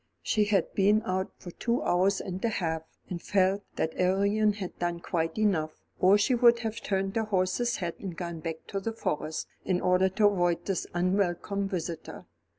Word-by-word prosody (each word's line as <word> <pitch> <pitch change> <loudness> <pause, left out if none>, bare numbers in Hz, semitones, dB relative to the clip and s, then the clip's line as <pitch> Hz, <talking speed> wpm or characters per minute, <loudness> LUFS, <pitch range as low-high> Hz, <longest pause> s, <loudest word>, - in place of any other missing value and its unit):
She 210 -1 +2
had 200 -4 +1
been 210 +2 +3
out 190 +1 -1
for 175 - -9
two 235 +7 -1
hours 190 +3 +2
and 185 0 -5
a 230 - +2
half, 160 -6 -1 0.3
and 175 -2 -5
felt 195 0 +2
that 160 - -1
Arion 200 +3 +2
had 195 -3 -7
done 175 -1 -1
quite 165 0 -2
enough, 170 -8 +1 0.2
or 190 +3 +6
she 210 +5 +2
would 235 -1 +6
have 225 -1 -4
turned 195 0 -1
her 220 - +1
horse's 210 +4 +1
head 170 -3 -3
and 180 -4 -6
gone 170 -2 -4
back 160 0 -5
to 195 - -2
the 225 +3 -3
Forest, 155 -7 -3 0.2
in 185 -2 +1
order 180 +1 +3
to 205 +3 +2
avoid 175 -4 +2
this 195 -2 -2
unwelcome 190 +2 0
visitor. 170 -3 -5
190 Hz, 185 wpm, -28 LUFS, 175-205 Hz, 0.3 s, or